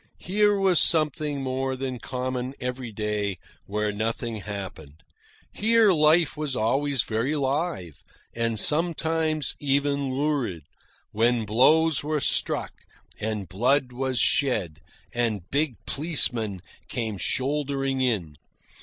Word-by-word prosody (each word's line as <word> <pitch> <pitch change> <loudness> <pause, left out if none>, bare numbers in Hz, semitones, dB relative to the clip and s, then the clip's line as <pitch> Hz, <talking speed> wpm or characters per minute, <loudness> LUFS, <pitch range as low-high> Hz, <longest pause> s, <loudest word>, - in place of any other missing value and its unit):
Here 205 +2 +2
was 190 -3 +4
something 150 -3 +1
more 130 0 -1
than 130 -1 -4
common 130 +1 -3
every 125 -2 -4
day 105 -2 -2 0.3
where 105 +1 -1
nothing 115 +2 -3
happened. 95 -8 -8 0.5
Here 225 -1 +4
life 155 -1 +4
was 150 -3 -3
always 135 +3 +1
very 115 +7 -1
live, 140 - -2 0.3
and, 115 -2 0
sometimes, 160 -1 +1
even 140 -1 0
lurid, 135 - -1 0.5
when 115 +1 +2
blows 150 +8 +4
were 150 0 0
struck, - - +1 0.5
and 105 -3 -3
blood 125 - +1
was 130 0 -2
shed, 105 - +1 0.3
and 110 -7 -1
big 145 -2 +1
policemen 120 - -1 0.2
came 110 -5 -3
shouldering 135 - -1
in. 95 - -1
130 Hz, 110 wpm, -26 LUFS, 110-150 Hz, 0.5 s, was